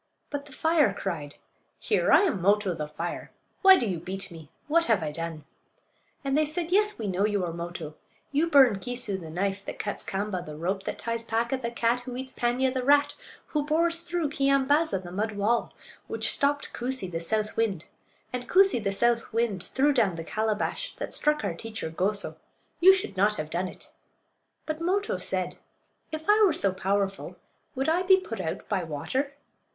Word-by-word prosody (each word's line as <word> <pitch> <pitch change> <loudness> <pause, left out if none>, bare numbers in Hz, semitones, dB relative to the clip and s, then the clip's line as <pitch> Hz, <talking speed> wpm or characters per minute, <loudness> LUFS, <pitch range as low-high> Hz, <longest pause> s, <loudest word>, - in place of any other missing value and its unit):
But 285 0 -4
the - - -15
fire 300 -7 +2
cried: 155 -7 -4 0.4
"Here! - - +1
I - - +8
am 325 - +1
Mo'to, 200 0 +3
the 155 -2 -4
fire. 165 +3 -5 0.3
Why 385 -1 +9
do 235 - -1
you 180 -4 -2
beat 190 +3 -5
me? 160 -3 -11 0.2
What 335 +2 +3
have 220 -7 +3
I 150 - -2
done?" 165 -1 -5 0.8
And 275 0 0
they 305 - +4
said: 330 +3 -3
"Yes, 420 +2 +3
we 225 - -4
know 190 0 0
you 205 -3 +1
are 170 - -4
Moto; 170 -2 -6 0.4
you 305 +4 +2
burn 265 -9 +6
Keesoo, 240 -3 -2
the 165 -3 -9
knife; 195 +4 -2
that - - -6
cuts 205 - -4
Kaamba, 195 -2 -3
the 150 -3 -8
rope; 190 +4 -2
that - - -3
ties 230 0 -2
Paaka, 230 +3 0
the 235 - -2
cat; 235 +1 +1
who 245 0 -7
eats 260 +1 -6
Paanya, 250 +2 +1
the 260 -1 -1
rat; 285 +2 +4 0.4
who 300 -1 0
bores 335 +3 +2
through 340 -3 -2
Keeyambaaza, 275 - +2
the 175 - -8
mud 210 +4 -2
wall; 210 +4 +1 0.4
which - - 0
stopped 285 +1 0
Koosee, 245 -6 -2
the 165 - -2
south 215 +6 -1
wind; 200 -8 0 0.5
and 250 0 -4
Koosee, 385 -7 +5
the 195 - 0
south 235 +3 +1
wind, 220 -5 0
threw 285 +3 +2
down 215 -9 +2
the 165 - -5
calabash 220 - -2
that - - -5
struck 300 0 +1
our - - -1
teacher 220 -7 -6
Goso. 200 +5 -2 0.4
You 370 +2 +9
should 375 - -1
not 205 +3 +3
have 155 -3 -5
done 180 +2 -1
it." - - -13 0.7
But 310 0 -4
Moto 390 +5 0
said, - - -3 0.5
"If 315 0 -6
I 420 +1 +5
were 380 -6 +5
so 195 -10 +1
powerful 195 +1 -1 0.4
would 270 +2 -1
I 330 +3 +3
be 375 +1 +6
put 230 - -5
out 160 -3 -4
by 195 -4 0
water?" 260 - -3
230 Hz, 195 wpm, -27 LUFS, 190-290 Hz, 0.8 s, Why